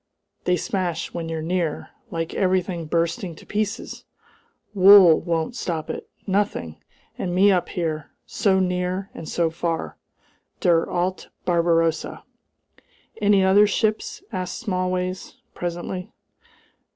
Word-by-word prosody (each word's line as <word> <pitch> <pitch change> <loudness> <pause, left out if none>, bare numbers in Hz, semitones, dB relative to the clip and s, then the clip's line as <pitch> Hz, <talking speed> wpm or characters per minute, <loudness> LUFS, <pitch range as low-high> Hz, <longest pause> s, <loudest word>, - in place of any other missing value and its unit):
They 180 0 +3
smash 175 -4 -2
when 165 -1 -4
you're 160 -1 -3
near! 170 -2 -2 0.2
Like 165 -4 -3
everything 185 -3 0
bursting 170 +1 -1
to - - -15
pieces! 210 0 -3 0.7
Wool 190 -4 +8
won't 165 +6 -1
stop 165 -10 -3
it - - -7 0.2
nothing! 195 - -1 0.4
And 175 -1 -2
me 200 +2 +6
up 180 -2 +1
here 155 -4 -3 0.2
so 195 -4 +2
near 180 +1 -1
and 160 - -8
so 165 -2 +1
far! 165 0 -3 0.6
Der 170 -3 +3
alte 180 +1 -2 0.2
Barbarossa!" 165 -2 +1 1.0
"Any 205 -2 +4
other 200 +2 +6
ships?" 215 +1 -1
asked 185 -3 -3
Smallways, 185 -3 -2 0.2
presently. 175 +1 -4
180 Hz, 115 wpm, -23 LUFS, 165-190 Hz, 1.0 s, Wool